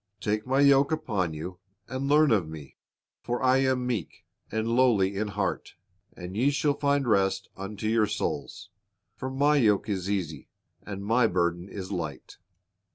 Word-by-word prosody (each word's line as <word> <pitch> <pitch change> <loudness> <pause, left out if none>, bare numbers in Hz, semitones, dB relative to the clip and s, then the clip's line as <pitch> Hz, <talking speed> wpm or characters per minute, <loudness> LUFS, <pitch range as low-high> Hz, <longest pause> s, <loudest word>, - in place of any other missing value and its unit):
Take 105 +2 -2
My 135 +2 +2
yoke 140 0 +5
upon 100 - -1
you, 90 +4 -7 0.3
and 130 +1 -3
learn 150 0 +5
of 95 -8 +2
Me; 75 -4 -10 0.5
for 120 +1 -3
I 130 0 +5
am 130 -2 +1
meek 120 -9 -4 0.3
and 110 +1 -1
lowly 115 -6 +3
in 105 +2 -1
heart, 100 -1 -3 0.4
and 90 +1 -7
ye 125 +6 +3
shall 145 0 +1
find 140 -1 0
rest 95 -3 +1
unto 100 +2 -6
your 110 -1 +3
souls; 105 - -4 0.4
for 130 - -5
My 145 +3 +3
yoke 105 -5 +3
is 95 -2 -2
easy, 80 -8 -3 0.3
and 100 -1 -7
My 115 +2 +3
burden 85 -1 -1
is 95 -2 -7
light." - - -5
110 Hz, 160 wpm, -27 LUFS, 95-130 Hz, 0.5 s, yoke